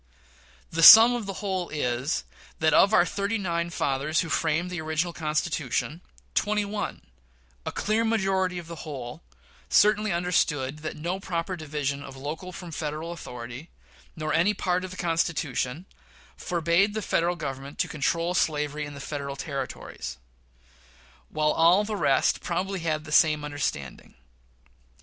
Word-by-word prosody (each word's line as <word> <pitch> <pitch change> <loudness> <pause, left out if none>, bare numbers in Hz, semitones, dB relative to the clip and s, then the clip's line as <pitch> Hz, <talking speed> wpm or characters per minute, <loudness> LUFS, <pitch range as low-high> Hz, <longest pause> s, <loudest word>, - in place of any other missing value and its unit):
The 165 - -1
sum 225 +7 +11
of 235 -4 -3
the - - -2
whole 185 -3 -2
is, 130 -1 -1 0.3
that 155 -1 +2
of 200 - +6
our 195 -5 +5
thirty 200 +4 -1
nine 170 -4 -2
fathers 145 0 0
who 165 - -5
framed 165 +3 0
the 175 -3 -3
original 160 +2 -1
Constitution, 155 -1 -2 0.3
twenty 210 0 +1
one 205 +1 -4 0.6
a - - -1
clear 215 +2 0
majority 190 -5 +1
of 175 - -6
the 165 0 -8
whole 130 -6 -7 0.5
certainly 210 +1 +4
understood 150 -5 0
that 155 0 -6
no 175 +5 -3
proper 185 -1 -3
division 145 -3 -3
of 135 -1 -10
local 155 +7 -6
from 175 -1 -9
Federal 155 +2 -4
authority, 125 -1 -8 0.5
nor 155 -1 -3
any 195 +6 +3
part 180 -1 0
of 185 - -5
the 185 - -10
Constitution, 165 -3 -1 0.5
forbade 175 +4 +1
the 215 - -2
Federal 175 0 +1
Government 135 -2 -6
to - - 0
control 165 +4 -1
slavery 150 -3 0
in 145 - -9
the - - -8
Federal 140 -1 -5
Territories; 135 - -6 1.1
whilst 155 0 0
all 175 +5 +6
the 215 0 -3
rest 140 -9 +2
probably 185 +2 -2
had 155 -2 -1
the 155 - -10
same 155 -1 +4
understanding. 140 - -4
165 Hz, 150 wpm, -26 LUFS, 150-185 Hz, 1.1 s, sum